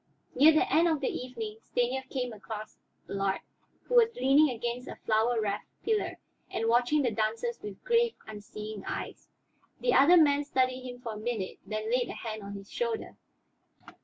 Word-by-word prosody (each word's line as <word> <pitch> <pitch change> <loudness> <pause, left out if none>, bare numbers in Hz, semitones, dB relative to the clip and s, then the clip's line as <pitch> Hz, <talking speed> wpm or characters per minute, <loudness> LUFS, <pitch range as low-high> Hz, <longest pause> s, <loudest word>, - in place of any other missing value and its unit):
Near 300 +5 +7
the 335 +5 +2
end 335 +2 +5
of 320 -3 +1
the 275 - -1
evening 225 -4 -5
Stanief 260 +3 -1
came 250 -3 -3
across 215 0 -8 0.3
Allard, 195 0 -1 0.4
who - - -6
was 470 -1 +5
leaning 275 +4 +5
against 240 +1 -4
a - - -6
flower 225 +2 +1
wreathed 205 -2 -2 0.2
pillar 440 -2 0 0.3
and 225 - -1
watching 245 +6 +3
the 245 - +1
dancers 225 +2 -1
with 205 -2 -8
grave, 470 -1 +2
unseeing 210 -1 -8
eyes. - - -5 0.5
The - - +2
other 330 +6 +7
man 290 -3 +5
studied 255 -2 0
him 245 0 -9
for 230 -2 -5
a - - -7
minute, 215 -3 -3
then 215 +2 -3
laid 250 0 +1
a - - -4
hand 220 -2 -6
on 200 0 -7
his 195 0 -10
shoulder. 470 -2 -3
245 Hz, 175 wpm, -30 LUFS, 215-285 Hz, 0.5 s, Near